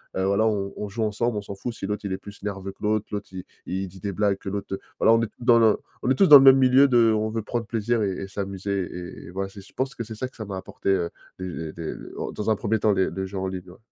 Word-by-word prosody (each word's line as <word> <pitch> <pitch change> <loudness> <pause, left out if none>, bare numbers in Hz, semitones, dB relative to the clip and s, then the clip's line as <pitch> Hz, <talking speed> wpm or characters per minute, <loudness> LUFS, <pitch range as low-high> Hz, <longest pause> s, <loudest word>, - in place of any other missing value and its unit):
Heu, 95 - 0
voilà, 100 +3 +2
on 100 -2 -1
on 105 - -3
joue 110 +3 -3
ensemble. 110 +2 0
On - - -2
s'en 100 -1 -8
fout 120 +4 -5
si 105 - -6
l'autre 105 0 -3
il 95 - -2
est 95 - -2
plus 100 0 -12
nerveux 100 -1 -4
que 95 - -18
l'autre, 105 0 +1
l'autre 105 0 -4
il 90 -1 -6 0.2
il 95 +1 -3
dit 95 +1 -13
des 100 +2 -3
blagues 100 0 +1
que - - -12
l'autre 100 -1 -4 0.2
voilà, - - +5
on 115 - +4
est 115 - -1
dans 120 -1 +5
le 110 -2 +5 0.3
on - - +1
est 130 - +4
tous 195 - +5
dans 145 -3 +12
le 135 - +6
même 135 0 +9
milieu 130 +1 +6
de: 120 -3 +5
«on 110 0 0
veut 110 +1 -2
prendre 115 +2 -3
plaisir 115 +1 0
et 100 - 0
et - - -6
s'amuser», 100 0 -3
et 90 0 -8
et - - -9
voilà, 95 +1 -3
c'est 100 0 -11
je 95 - -18
pense 130 +1 -2
que 115 - -4
c'est 110 0 -8
ça, 130 +4 -3
que 130 - -20
ça 110 - -5
m'a 100 -2 -5
apporté, 95 - -5
heu, 90 -3 +2 0.3
des 85 -4 -5
des 85 -2 -5 0.4
dans 105 +1 -2
un 110 - +4
1er 110 +2 0
temps 105 -1 +3
les 95 -1 +2
le 95 +2 -4
jeu 95 +1 -6
en 95 - -1
ligne, 95 -1 -6
ouais. 90 - -14
105 Hz, 305 wpm, -25 LUFS, 95-115 Hz, 0.4 s, dans